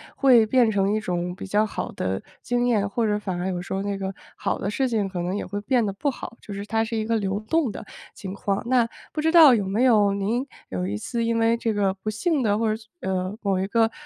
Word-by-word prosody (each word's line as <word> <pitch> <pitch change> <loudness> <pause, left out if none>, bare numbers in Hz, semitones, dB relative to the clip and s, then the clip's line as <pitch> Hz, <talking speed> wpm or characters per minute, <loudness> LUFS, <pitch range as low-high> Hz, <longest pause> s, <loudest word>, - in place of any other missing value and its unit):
会 245 -5 +6
变 235 -1 +3
成 200 0 +1
一 215 - 0
种 180 -2 -2
比 195 - -7
较 210 +3 +2
好 - - -4
的 95 +1 -2 0.2
经 245 0 0
验， 210 -4 +2
或 225 +2 0
者 210 -1 +1
反 185 -4 -4
而 180 +2 -2
有 180 -1 -2
时 180 - -6
候 195 - -1
那 200 -1 -2
个 195 0 -4 0.2
好 - - -1
的 200 - -3
事 265 +3 0
情 215 -5 0
可 185 -2 -5
能 180 +2 -2
也 205 - -3
会 205 +2 -4
变 245 0 +2
得 200 - -1
不 200 +9 -1
好。 245 -3 -7
就 205 - -8
是 200 +1 -5
它 225 +1 0
是 225 +1 -4
一 220 - 0
个 230 0 +1
流 200 -1 -2
动 280 +4 +1
的 - - -8 0.3
情 190 -1 -7
况， 200 0 -2
那 245 -2 +3 0.2
不 310 - -5
知 320 +2 +1
道 310 -6 +9
有 205 -4 +1
没 215 +6 +1
有 210 -5 +4
您 220 +7 -1 0.2
有 90 -1 -2
一 100 - -2
次 230 - -2
因 230 0 +1
为 230 +1 +3
这 230 -1 -1
个 200 -2 +1
不 195 +3 -5
幸 285 - 0
的 210 -4 +2
或 220 -1 +1
者， 220 - -6 0.2
呃， 185 +1 -2
某 195 -3 0
一 190 - -1
个 225 +1 +2
210 Hz, 285 characters per minute, -24 LUFS, 195-230 Hz, 0.3 s, 道